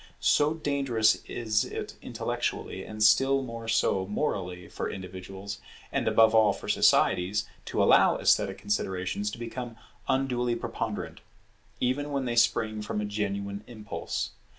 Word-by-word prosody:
So 150 +2 +3
dangerous 135 -8 +1
is 110 -3 0
it - - -5
intellectually, - - -3
and 110 0 -3
still 135 +6 +5
more 115 -2 -7
so 105 -4 +1
morally, 90 - -2
for - - -4
individuals, 95 +2 -7 0.3
and - - -1
above 110 0 +5
all, 110 -2 +5
for 100 - -9
societies 95 +4 +3 0.2
to - - 0
allow - - +5
esthetic - - +2
considerations 100 0 -2
to 105 - -7
become 120 0 -6 0.3
unduly 125 -2 +1
preponderant; 115 - -4 0.6
even 145 +4 0
when 140 -2 -1
they 120 -1 -1
spring 110 -2 +2
from 105 0 -3
a 105 - -1
genuine 100 -1 -3
impulse. 110 -4 -4
110 Hz, 135 wpm, -28 LUFS, 100-125 Hz, 0.6 s, still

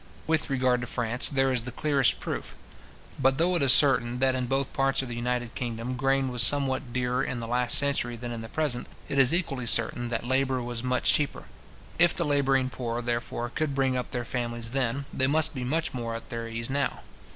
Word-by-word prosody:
With 160 -1 0
regard 130 -2 +1
to 120 - -5
France, 120 0 +3
there 135 -1 +1
is 125 -2 0
the 125 +2 -7
clearest 140 -4 +2
proof. - - -5 0.6
But 135 +1 +2
though 175 +3 +2
it 170 - +1
is 135 -2 +5
certain, 125 -3 +5
that 130 +1 +2
in 130 -1 -2
both 135 +1 -1
parts 135 0 +1
of 130 - -7
the 120 - -5
united 120 0 -2
kingdom 120 +1 -4
grain 135 +1 +1
was 125 -1 -1
somewhat 135 -2 +2
dearer 125 0 -1
in 125 - -3
the 115 - -5
last 125 0 +2
century 140 -4 0
than 120 +1 -6
in 115 -1 -5
the 110 - -8
present, 145 -5 -1 0.2
it 140 - -1
is 130 -2 +6
equally 140 -8 -2
certain 120 0 +3
that 120 0 -3
labour 130 0 +1
was 120 -1 -4
much 125 0 +2
cheaper. 145 -1 -1 0.6
If 175 0 +5
the 170 - 0
labouring 135 -3 +1
poor, 120 -1 -4
therefore, 120 0 -3
could 155 -3 -1
bring 135 -1 +1
up 125 -1 -3
their 120 -1 -4
families 120 -1 -4
then, 135 +1 -1
they 130 - +1
must 155 +2 +2
be 130 -3 -5
much 160 +6 -1
more 115 -2 -4
at 115 - -9
their 115 -1 -4
ease 115 0 -4
now. 140 +1 -2
125 Hz, 220 wpm, -27 LUFS, 120-135 Hz, 0.6 s, is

